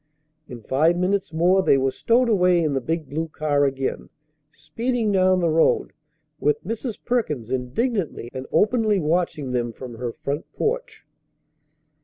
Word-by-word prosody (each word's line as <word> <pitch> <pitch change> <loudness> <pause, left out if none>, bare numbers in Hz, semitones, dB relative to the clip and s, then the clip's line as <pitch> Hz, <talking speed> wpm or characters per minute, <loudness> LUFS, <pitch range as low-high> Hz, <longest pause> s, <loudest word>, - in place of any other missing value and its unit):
In 120 -3 -9
five 155 +9 +2
minutes 190 0 0
more 175 +4 +3
they 140 - +4
were 135 0 +1
stowed 240 - +2
away 180 -5 +3
in 150 -3 0
the 135 - 0
big 160 +3 -3
blue 160 +4 -3
car 150 -2 +1
again, 135 -1 -3 0.4
speeding 225 +9 -2
down 185 -1 +3
the 170 - +2
road, 160 +1 +2 0.5
with 150 - +1
Mrs. 225 +2 -4
Perkins 150 - -1
indignantly 150 - -2
and 130 0 -6
openly 215 -1 +2
watching 160 -4 -1
them 120 -1 -1
from 120 0 -9
her 125 -2 -3
front 140 +6 -5
porch. - - -3
165 Hz, 150 wpm, -23 LUFS, 135-200 Hz, 0.5 s, they